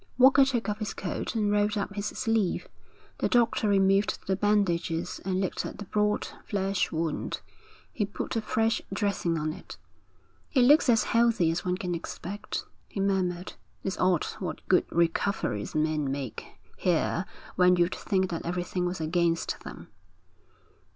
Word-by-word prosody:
Walker 265 Hz, +2 st, +7 dB
took 255 Hz, -4 st, 0 dB
off 210 Hz, 0 st, -2 dB
his 215 Hz, -, -4 dB
coat 190 Hz, +4 st, -4 dB
and 210 Hz, -2 st, +1 dB
rolled 210 Hz, +1 st, +2 dB
up 200 Hz, 0 st, -2 dB
his 205 Hz, 0 st, -3 dB
sleeve. 225 Hz, -6 st, 0 dB, 0.5 s
The -, -, +1 dB
doctor 235 Hz, -3 st, +3 dB
removed 195 Hz, 0 st, +3 dB
the 190 Hz, -, +1 dB
bandages 180 Hz, -5 st, 0 dB
and 185 Hz, 0 st, -1 dB
looked 190 Hz, -2 st, -1 dB
at -, -, -6 dB
the 205 Hz, -, -7 dB
broad 210 Hz, +2 st, 0 dB, 0.2 s
flesh 195 Hz, -2 st, -1 dB
wound. 160 Hz, -1 st, -2 dB, 0.5 s
He 210 Hz, -4 st, -1 dB
put 205 Hz, -, -4 dB
a 225 Hz, -, +1 dB
fresh 225 Hz, +1 st, +1 dB
dressing 195 Hz, -4 st, 0 dB
on 155 Hz, 0 st, -1 dB
it. 185 Hz, -, -11 dB, 0.8 s
'It 260 Hz, -, +5 dB
looks 290 Hz, +2 st, +6 dB
as 225 Hz, -2 st, +5 dB
healthy 230 Hz, -8 st, +3 dB
as 165 Hz, -, -2 dB
one 180 Hz, 0 st, 0 dB
can 180 Hz, -2 st, -3 dB
expect,' 175 Hz, +4 st, -5 dB, 0.2 s
he -, -, -6 dB
murmured. 185 Hz, -2 st, 0 dB, 0.3 s
'It's 190 Hz, -1 st, -3 dB
odd 180 Hz, -3 st, +3 dB
what 185 Hz, -, -5 dB
good 185 Hz, -, +4 dB
recoveries 170 Hz, -, 0 dB
men 155 Hz, -2 st, +1 dB
make 135 Hz, -3 st, -5 dB, 0.3 s
here 175 Hz, +1 st, +1 dB, 0.3 s
when 180 Hz, 0 st, +5 dB
you'd 175 Hz, 0 st, +2 dB
think 190 Hz, -3 st, 0 dB
that 165 Hz, -, -3 dB
everything 180 Hz, +1 st, -2 dB
was 180 Hz, 0 st, -3 dB
against 165 Hz, +1 st, 0 dB
them.' -, -, -10 dB
190 Hz, 155 wpm, -28 LUFS, 175-210 Hz, 0.8 s, Walker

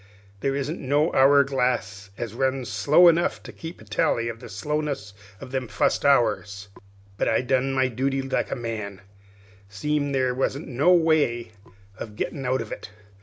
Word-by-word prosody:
There 135 Hz, +6 st, -1 dB
isn't 140 Hz, +5 st, -3 dB
no 145 Hz, +5 st, +1 dB
hour 140 Hz, +1 st, +6 dB
glass 120 Hz, -7 st, -2 dB
as 115 Hz, -3 st, -5 dB
runs 130 Hz, 0 st, -1 dB
slow 140 Hz, -, +5 dB
enough 170 Hz, 0 st, +2 dB
to -, -, -9 dB
keep 165 Hz, +1 st, -9 dB
a -, -, -13 dB
tally 115 Hz, +2 st, 0 dB
of 115 Hz, 0 st, -7 dB
the -, -, -11 dB
slowness 140 Hz, -1 st, -3 dB, 0.3 s
of 125 Hz, -, -10 dB
them 130 Hz, -2 st, -2 dB
fust 105 Hz, -1 st, 0 dB
hours. 105 Hz, -6 st, +1 dB, 0.5 s
But -, -, 0 dB
I 110 Hz, -, +2 dB
done 130 Hz, +1 st, 0 dB
my 130 Hz, -1 st, +2 dB
duty 135 Hz, +2 st, -1 dB
like 135 Hz, -, -1 dB
a -, -, -2 dB
man, 110 Hz, -5 st, -5 dB, 0.7 s
seem' 145 Hz, +7 st, -1 dB
there 130 Hz, -2 st, +1 dB
wasn't 135 Hz, +4 st, -2 dB
no 140 Hz, +6 st, +2 dB
way 155 Hz, -10 st, +2 dB, 0.5 s
of 105 Hz, -2 st, -7 dB
gettin' 135 Hz, +4 st, -4 dB
out 130 Hz, 0 st, +1 dB
of 110 Hz, -, -8 dB
it. -, -, -7 dB
130 Hz, 170 wpm, -24 LUFS, 115-140 Hz, 0.7 s, hour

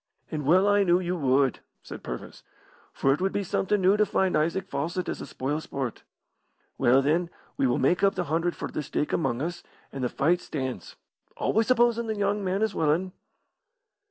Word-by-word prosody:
"And 150 Hz, -4 st, -3 dB
well 185 Hz, +5 st, +5 dB
I 205 Hz, 0 st, +4 dB
knew 175 Hz, -1 st, +3 dB
you 180 Hz, 0 st, -2 dB
would," 135 Hz, -4 st, +2 dB, 0.2 s
said -, -, -9 dB
Purvis, -, -, -7 dB, 0.5 s
"for 135 Hz, -, +2 dB
it 150 Hz, -, -3 dB
would 190 Hz, +1 st, +1 dB
be 205 Hz, -, -1 dB
somethin' 195 Hz, +2 st, 0 dB
new 195 Hz, +3 st, +5 dB
to 210 Hz, -, +4 dB
find 190 Hz, -1 st, +1 dB
Isaac 170 Hz, +5 st, 0 dB
Fawcett 170 Hz, +3 st, -3 dB
as -, -, -4 dB
a -, -, -7 dB
spoil 145 Hz, +4 st, -3 dB
sport. 135 Hz, -6 st, -5 dB, 0.7 s
Well, 130 Hz, +3 st, +4 dB
then, 165 Hz, +5 st, +1 dB, 0.3 s
we 135 Hz, -, +2 dB
will 120 Hz, -, +1 dB
make 155 Hz, +7 st, +2 dB
up 195 Hz, 0 st, +3 dB
the 180 Hz, -, -1 dB
hundred 165 Hz, +2 st, -1 dB
for -, -, -4 dB
the -, -, -3 dB
stake 150 Hz, +1 st, -2 dB
among 130 Hz, -5 st, 0 dB
us, 175 Hz, +1 st, -4 dB, 0.3 s
and 135 Hz, -, -5 dB
the 125 Hz, -, +1 dB
fight 175 Hz, +5 st, +1 dB
stands 130 Hz, -, -5 dB, 0.4 s
always 225 Hz, 0 st, +1 dB
supposin' 235 Hz, -2 st, +3 dB
the 220 Hz, -1 st, -2 dB
young 205 Hz, 0 st, 0 dB
man 190 Hz, +3 st, 0 dB
is 220 Hz, -2 st, 0 dB
willin'." 165 Hz, +4 st, +1 dB
175 Hz, 195 wpm, -27 LUFS, 140-195 Hz, 0.7 s, well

